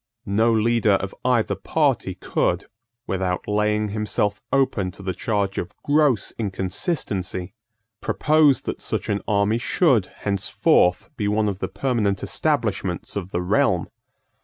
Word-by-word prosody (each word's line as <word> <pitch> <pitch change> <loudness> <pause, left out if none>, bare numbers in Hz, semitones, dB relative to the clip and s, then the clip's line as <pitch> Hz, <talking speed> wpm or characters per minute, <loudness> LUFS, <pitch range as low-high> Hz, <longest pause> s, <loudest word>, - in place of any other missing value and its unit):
No 110 +3 +2
leader 115 -1 +3
of 100 0 -1
either 125 -3 +2
party - - 0
could, - - -1 0.4
without 95 -1 -2
laying 105 0 +1
himself 105 -1 -1
open 130 -9 +1
to 100 - -10
the 95 -1 -2
charge 100 0 -1
of 90 - -6
gross 145 -5 +2
inconsistency, 95 - -2 0.5
propose 150 -3 +3
that - - -4
such - - -3
an 100 - 0
army 105 +2 +2
should 125 - +2
henceforth 100 -2 +1
be 105 - -1
one 105 +1 +1
of 100 -2 -2
the - - -2
permanent 100 -2 -1
establishments - - -1
of 95 -3 -4
the 90 -1 -2
realm. 90 - +2
105 Hz, 135 wpm, -23 LUFS, 95-115 Hz, 0.5 s, leader